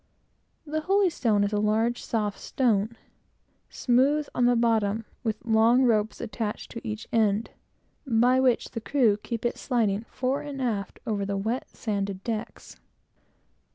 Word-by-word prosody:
The 310 +1 -2
holystone 325 - +2
is 205 +1 -1
a 205 - +1
large, 220 +3 +1
soft 210 -3 -2
stone, 225 -3 0 0.7
smooth 275 +4 +2
on 245 -1 +3
the 245 - +4
bottom, 225 -2 +1 0.2
with 220 -1 -3
long 230 +3 +4
ropes 220 -3 +1
attached 220 -2 -4
to 230 - -7
each 215 0 -5
end, 220 -1 +2 0.6
by 245 +2 +4
which 255 -2 +2
the 230 - -5
crew 220 -2 +2
keep 230 +2 -5
it 240 - -1
sliding 220 -4 0
fore 260 +2 -1
and 285 -2 -6
aft, 215 -7 -2
over 210 -3 -1
the 200 0 -2
wet, 225 +6 -2
sanded 200 -3 -3
decks. 225 -1 -5
225 Hz, 145 wpm, -26 LUFS, 210-250 Hz, 0.7 s, the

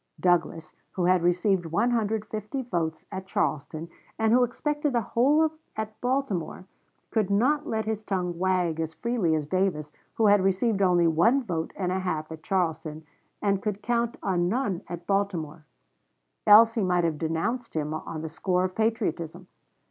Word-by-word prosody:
Douglas, 165 -3 +1 0.2
who 180 - -1
had 180 0 +4
received 175 +1 +1
150 220 - -1
votes 165 -8 -3
at 190 -1 -6
Charleston, 160 -5 -2 0.3
and 220 0 +2
who 250 +1 +5
expected 295 +4 -1
the 235 - +2
whole 290 +9 +3 0.2
at 215 0 -5
Baltimore, 245 -9 -2 0.5
could 215 -4 +1
not 255 +9 +2
let 220 -1 -1
his 215 -1 -3
tongue 180 -4 -2
wag 180 -3 +1
as 160 0 -3
freely 225 -9 0
as 155 -2 -1
Davis, 165 -3 -1 0.2
who 225 - +2
had 205 -2 +5
received 195 +2 +1
only 180 -2 +4
one 200 - +3
vote 165 -7 -3
and 180 -2 -2
a 190 - 0
half 160 -4 -3
at 160 -1 -8
Charleston, 160 -4 -2 0.4
and 200 -2 +1
could 210 -1 -3
count 235 0 0
on 175 -3 +1
none 210 -6 -1
at 175 0 -7
Baltimore; 175 -6 -2 0.8
else 225 +2 +8
he 225 - 0
might 180 -2 +2
have 160 -3 -1
denounced 200 +10 -2
him 155 -1 -1
on 155 0 -5
the 160 - -4
score 180 +3 0
of 185 0 -2
patriotism. 180 -6 -1
190 Hz, 165 wpm, -27 LUFS, 165-220 Hz, 0.8 s, else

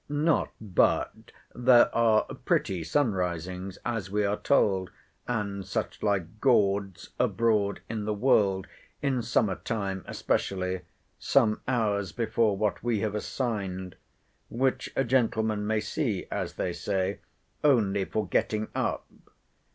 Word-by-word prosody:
Not 150 +2 +1
but 105 -5 0 0.2
there 120 0 +5
are 115 -2 +4
pretty 90 -4 -1
sun 120 - +1
risings, 90 +1 -3
as 115 -6 -2
we 105 +1 +1
are 100 +1 +1
told, 95 -9 +2 0.4
and 100 -5 -2
such - - -4
like 100 0 -1
gawds, 100 -7 +2
abroad 110 -3 +1
in 110 -2 -4
the 105 - 0
world, 100 -5 +3 0.4
in 135 -3 +1
summer 110 -4 +1
time 95 -4 -3
especially, 95 -1 -1 0.4
some 115 -6 +2
hours 105 -6 0
before 110 -3 +1
what 105 -1 0
we 115 -4 0
have 110 -2 -1
assigned; 100 -5 -3 0.5
which 130 +2 0
a 135 - +2
gentleman 110 -4 +1
may 110 0 +1
see, 105 -2 -2
as - - -3
they 90 - -2
say, 95 +1 -1 0.4
only 105 -9 +3
for 105 +1 -2
getting 110 +3 0
up. - - -1
105 Hz, 130 wpm, -28 LUFS, 95-115 Hz, 0.5 s, there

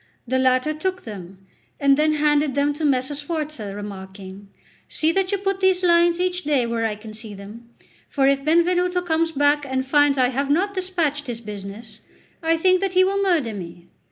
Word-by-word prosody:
The 260 +2 +1
latter 260 +3 +2
took 370 +4 -3
them, 195 -3 -10 0.3
and 280 -1 +4
then 305 +2 +2
handed 295 -2 +1
them 285 +1 +1
to 305 +2 -6
Messer 270 -1 +1
Sforza, 290 - -4
remarking: 195 -1 -9 0.4
"See 315 +1 +1
that 380 +1 0
you 400 - +1
put 390 0 -2
these 375 -1 +2
lines 340 0 +4
each 360 0 -1
day 285 -5 +1
where 230 -1 -1
I 215 - -4
can 215 +1 -11
see 215 -1 -9
them; 215 +4 -12 0.4
for 275 -2 +1
if 275 0 +2
Benvenuto 355 +3 +2
comes 330 -1 0
back 290 0 +2
and 260 -1 -2
finds 290 0 +3
I 250 -1 +3
have 275 +2 -2
not 375 +7 +1
despatched 340 -7 -2
his 235 -2 -4
business, 210 +1 -9 0.4
I 330 0 +1
think 370 +2 +3
that 390 -2 -1
he 370 0 +5
will 395 +1 +1
murder 330 - +1
me." 175 -2 -9
290 Hz, 190 wpm, -22 LUFS, 230-340 Hz, 0.4 s, he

